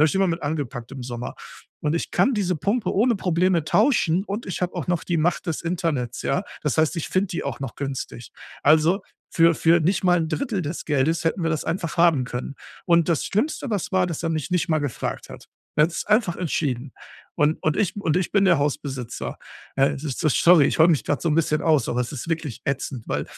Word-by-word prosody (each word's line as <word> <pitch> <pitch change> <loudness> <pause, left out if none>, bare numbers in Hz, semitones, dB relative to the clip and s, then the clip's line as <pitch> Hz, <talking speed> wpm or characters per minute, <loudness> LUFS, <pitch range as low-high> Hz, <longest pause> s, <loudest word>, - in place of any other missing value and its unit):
habe 155 - +6
ich - - -3
immer 195 0 +3
mit 170 0 -2
angepackt 140 -5 -4
im 135 -2 -7
Sommer. 120 0 -6 0.5
Und 150 +1 0
ich 170 - -2
kann 265 - +2
diese 185 -4 0
Pumpe 205 - -1
ohne 230 +3 +3
Probleme 180 -2 +1
tauschen, 195 - +2
und 210 +3 -4
ich 185 - -4
habe 180 - -1
auch - - -4
noch 175 -2 0
die 175 - 0
Macht 170 +3 0
des 165 -1 -2
Internets, 165 -8 -2
ja? 180 - 0 0.2
Das 150 - 0
heißt, 160 +1 +3
ich 165 - -3
finde 190 +1 +1
die 175 - -3
auch - - -4
noch 135 -4 -5
günstig. 135 -4 -5 0.3
Also, 160 +6 +4 0.3
für 165 0 +5
für 165 +2 +4
nicht 175 +5 +1
mal 180 -1 +4
'n 160 - -1
Drittel 230 - -2
des 155 +3 -5
Geldes 150 +2 +1
hätten 165 +1 0
wir 165 - +1
das 155 -1 -2
einfach 165 0 -3
haben 165 -7 +4
können. 125 +2 -5 0.3
Und 170 -1 +3
das 165 - +1
Schlimmste, 255 +4 -1
was 200 -3 -2
war, 185 -1 +3
dass 165 -1 -4
er - - +1
mich 160 0 -2
nicht 180 -2 0
mal 155 -1 +2
gefragt 145 -5 -4
hat. - - -11 0.3
Er 150 - +6
hat 165 - -2
es - - -3
einfach 210 -5 +2
entschieden. 140 -6 -2 0.4
Und 150 +2 +2
und 155 - +1
ich 200 - 0
und 165 -6 0
ich 180 -1 -1
bin 200 -1 +4
der 175 -5 +4
Hausbesitzer. 135 -4 -3 0.4
Ey, 135 +1 +3
ist 140 -2 -5
so 155 - +2
sorry, 160 +1 +5
ich - - -1
heule 160 - +7
mich 155 - +1
grade 145 - -1
so 170 - +1
'n 155 - +1
bisschen 155 -2 +1
aus, 155 -3 +2
aber 125 - 0
es 125 - -2
ist 145 +3 -6
wirklich 160 -7 -3
ätzend, 135 -3 -3
weil - - -1
165 Hz, 235 wpm, -23 LUFS, 145-180 Hz, 0.5 s, heule